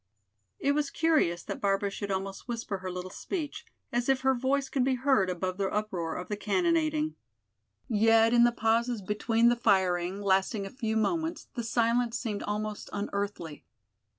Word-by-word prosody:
It 280 Hz, -, +1 dB
was 295 Hz, 0 st, 0 dB
curious 300 Hz, -, +1 dB
that -, -, -6 dB
Barbara 200 Hz, 0 st, +1 dB
should 200 Hz, +1 st, -5 dB
almost 195 Hz, +2 st, -4 dB
whisper 230 Hz, -5 st, -3 dB
her 185 Hz, 0 st, -5 dB
little 180 Hz, 0 st, -6 dB
speech, 315 Hz, -, -5 dB, 0.3 s
as 240 Hz, +2 st, 0 dB
if 270 Hz, -1 st, +3 dB
her 265 Hz, 0 st, +3 dB
voice 270 Hz, +2 st, 0 dB
could 265 Hz, -2 st, 0 dB
be 260 Hz, 0 st, +2 dB
heard 255 Hz, -7 st, +2 dB
above 185 Hz, +1 st, -2 dB
the 195 Hz, -1 st, +1 dB
uproar 185 Hz, -6 st, -2 dB
of 180 Hz, -, -5 dB
the 210 Hz, -, -2 dB
cannonading. 310 Hz, -, +1 dB, 0.7 s
Yet 225 Hz, +1 st, +4 dB
in 240 Hz, 0 st, +6 dB
the 240 Hz, -, +5 dB
pauses 230 Hz, 0 st, 0 dB
between 225 Hz, +4 st, +2 dB
the 240 Hz, -, +3 dB
firing 190 Hz, -4 st, +1 dB
lasting 195 Hz, +1 st, +1 dB
a 195 Hz, -, -7 dB
few 225 Hz, -4 st, -2 dB
moments 325 Hz, +9 st, -1 dB
the 240 Hz, -, -3 dB
silence 235 Hz, +1 st, +1 dB
seemed 220 Hz, -4 st, -3 dB
almost 210 Hz, 0 st, -4 dB
unearthly. 200 Hz, -6 st, -4 dB
225 Hz, 170 wpm, -29 LUFS, 195-255 Hz, 0.7 s, in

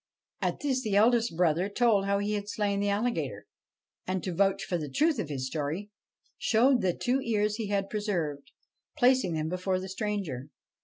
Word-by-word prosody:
' -, -, -46 dB
At -, -, -1 dB
this 265 Hz, -3 st, 0 dB
the 215 Hz, -5 st, -1 dB
eldest 230 Hz, -3 st, +3 dB
brother 175 Hz, +2 st, +2 dB
told 210 Hz, -2 st, +3 dB
how 200 Hz, 0 st, +2 dB
he 205 Hz, +1 st, -1 dB
had 205 Hz, 0 st, -3 dB
slain 205 Hz, -1 st, 0 dB
the 205 Hz, 0 st, +1 dB
alligator; 225 Hz, +4 st, -1 dB, 0.6 s
and, 185 Hz, -1 st, -1 dB
to 185 Hz, -, -3 dB
vouch 195 Hz, +2 st, +2 dB
for 180 Hz, -, -2 dB
the 150 Hz, -2 st, -5 dB
truth 300 Hz, -, +2 dB
of 165 Hz, -, -3 dB
his 135 Hz, -3 st, -3 dB
story, 155 Hz, +9 st, -3 dB, 0.5 s
showed 245 Hz, +3 st, +3 dB
the 185 Hz, -2 st, +1 dB
two 260 Hz, +2 st, +1 dB
ears 210 Hz, -3 st, 0 dB
he 225 Hz, -3 st, -3 dB
had 200 Hz, -1 st, 0 dB
preserved, 175 Hz, -10 st, -2 dB, 0.5 s
placing 250 Hz, -, +4 dB
them 155 Hz, 0 st, -1 dB
before 185 Hz, +2 st, -1 dB
the 190 Hz, -, -6 dB
stranger. 190 Hz, -, -3 dB
200 Hz, 190 wpm, -29 LUFS, 180-220 Hz, 0.6 s, placing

